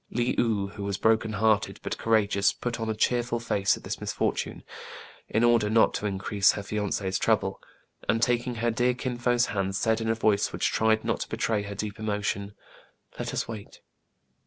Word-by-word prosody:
Le 120 0 0
ou, 105 -4 +1
who 100 0 -8
was 100 -1 -2
broken 110 0 +2
hearted, 110 +1 +1
but - - -3
courageous, 100 -3 +2
put 120 +2 -4
on 115 0 -2
a 110 - -1
cheerful 120 +1 +1
face 100 -4 +1
at - - -14
this - - -5
misfortune, - - -2 0.7
in 110 - +1
order 120 -3 +4
not 110 +1 +4
to 105 - -2
increase 100 0 +2
her 105 - -5
fiance's 100 -2 -2
trouble, - - +1 0.5
and, 115 - +3
taking 120 +1 +1
her 115 +1 0
dear 125 +2 +1
Kin 125 0 -3
Fo's 120 0 +2
hand, 95 -1 -1
said, 110 +2 +1
in 115 - -1
a 115 - +2
voice 105 -2 +2
which - - 0
tried 110 0 +2
not - - 0
to - - -5
betray 110 -2 0
her 100 0 -6
deep 105 +1 -5
emotion, 105 -1 -2 0.6
"Let - - -3
us - - -2
wait 110 -3 -9
110 Hz, 190 wpm, -27 LUFS, 100-115 Hz, 0.7 s, order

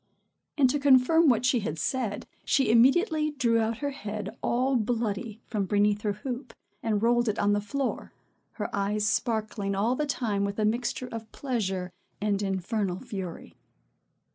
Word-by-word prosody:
And, 275 -3 +5
to 290 - 0
confirm 280 +4 +5
what 240 -1 +3
she 250 -1 +3
had 165 -7 -3
said, 215 - -2 0.2
she 270 -5 +2
immediately 305 - +4
drew 245 -6 +1
out 225 0 0
her 285 - 0
head 210 -5 -6
all 260 +3 +1
bloody 225 -1 -1
from 205 -3 -2
beneath 205 +1 +2
her 210 -1 0
hoop, 245 +4 -6 0.3
and 220 -2 0
rolled 240 0 +3
it 210 - -1
on 205 0 +2
the 205 - +1
floor, 270 +6 -3 0.4
her 210 - -3
eyes 205 +1 0
sparkling 215 -2 -1
all 220 +6 +1
the 300 +2 -1
time 220 -7 -1
with 200 0 -2
a 215 - +1
mixture 235 +3 -1
of 225 -1 -7
pleasure 195 -9 -2 0.3
and 205 -1 0
infernal 195 -1 -1
fury. 185 -5 -7
220 Hz, 165 wpm, -28 LUFS, 205-255 Hz, 0.4 s, And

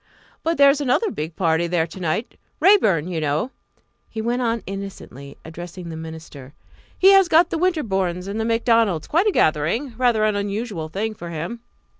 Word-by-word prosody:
"But 330 +1 -1
there 280 -1 +7
is 290 +1 -2
another 290 - +1
big 160 +2 -5
party 165 -1 +1
there 170 -1 +1
to 190 - -11
night 180 +7 -3 0.2
Raeburn 210 - +4
you 170 -3 -3
know," 155 - -1 0.6
he 225 - -7
went 240 +3 -1
on 230 -2 -1
innocently, 195 -8 -8
addressing 175 +2 -8
the 160 - -6
minister; 160 -4 -10 0.4
"he 385 +1 +6
has 390 -2 +6
got 340 +1 +4
the 325 - -1
Winterbournes 195 - -1
and 205 +2 -4
the 220 - -1
Macdonalds 230 -7 +2
quite 345 +7 +1
a - - +4
gathering 170 - +1
rather 240 -4 +3
an 215 -1 +1
unusual 200 -4 -3
thing 215 +6 -3
for 175 -5 -9
him." 170 +8 -5
200 Hz, 180 wpm, -22 LUFS, 165-245 Hz, 0.6 s, there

